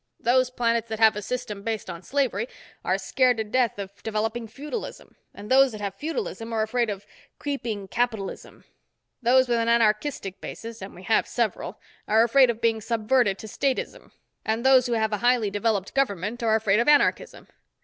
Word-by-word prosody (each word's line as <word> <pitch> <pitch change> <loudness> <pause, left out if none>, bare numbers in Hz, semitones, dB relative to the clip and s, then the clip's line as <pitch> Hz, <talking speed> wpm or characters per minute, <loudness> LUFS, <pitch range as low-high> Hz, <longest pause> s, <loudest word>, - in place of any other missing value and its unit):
Those 255 +1 +3
planets 235 -2 0
that 220 - -3
have 220 -1 +5
a 210 - -4
system 215 -2 -4
based 220 0 -3
on 170 -2 -7
slavery 235 0 -1 0.4
are - - +1
scared 255 -3 +2
to 220 - 0
death 235 +1 0
of 200 0 -8
developing 225 +1 -2
feudalism, 295 - -7 0.2
and 205 - -10
those 265 0 +5
that 210 - -7
have 200 -1 -3
feudalism 290 - -4
are 220 -1 +1
afraid 235 +1 0
of 200 -1 -5 0.3
creeping 235 -9 -4
capitalism. 220 -2 -3 0.6
Those 255 +2 +4
with 240 -1 +1
an 230 0 +1
anarchistic 215 -2 +1
basis—and 225 -4 -8
we 180 - -12
have 220 +4 +2
several—are 225 -1 -1
afraid 255 +2 +5
of 230 -1 -2
being 225 -1 +1
subverted 225 -1 +1
to - - -10
statism, 265 +5 -2 0.3
and 225 +3 -1
those 260 -1 +6
who 240 - -1
have 220 -1 0
a - - +1
highly 240 -1 +2
developed 205 -1 -1
government 230 -3 -1
are 225 -1 +3
afraid 215 -1 +2
of 235 - +1
anarchism. 295 +11 +2
230 Hz, 175 wpm, -25 LUFS, 210-250 Hz, 0.6 s, those